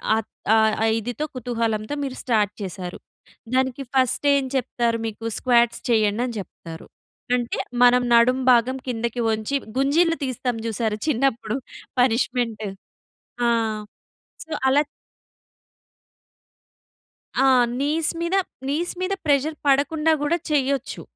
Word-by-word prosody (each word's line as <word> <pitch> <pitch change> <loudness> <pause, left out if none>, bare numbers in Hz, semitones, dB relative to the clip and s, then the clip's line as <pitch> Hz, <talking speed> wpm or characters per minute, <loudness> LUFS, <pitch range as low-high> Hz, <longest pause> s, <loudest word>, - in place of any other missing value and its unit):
ఆహ్, 225 - -2 0.3
ఆహ్, 220 -1 +4
ఆ - - +3
ఇదితో 245 +6 -3
కుతూహలంతో 230 -2 -2
మీరు 265 -2 -4
స్టార్ట్ 215 -5 +2
చేసారు. 185 -2 -6 0.6
దానికి 260 +1 +1
ఫస్ట్ 260 +1 +1
ఏం 275 -1 +1
చెప్తారు? 240 -2 0
మీకు 225 +1 -7
స్క్వాట్స్ 240 -2 +2
చేయండని 225 +2 +2
చెప్తారు. 165 -4 -10 0.5
అంటే 240 -1 -2 0.3
మనం 245 0 +6
నడుం 235 +2 +5
భాగం 245 +2 +3
కిందకి 235 0 -2
వంచి, 220 +5 -2 0.2
గుంజీలు 325 +5 +3
తీస్తాం 255 -2 -2
చూసారా 220 -1 -1
చిన్నప్పుడు. 240 -5 0 0.5
పనిష్మెంట్. 240 -2 +1 0.9
ఆహ్, 225 -2 0 0.6
సో, 320 - -30 0.2
అలా 275 +2 +5 2.6
ఆ! 270 - +5 0.3
నీస్ 300 +3 +1
మీద 340 +3 0 0.3
నీస్ 330 +5 -1
మీద 370 +1 0
ప్రెషర్ 295 +1 +2
పడకుండా 295 +3 +3
గూడా 300 +4 +1
చేయొచ్చు. 275 -2 0
245 Hz, 110 wpm, -23 LUFS, 225-275 Hz, 2.6 s, మనం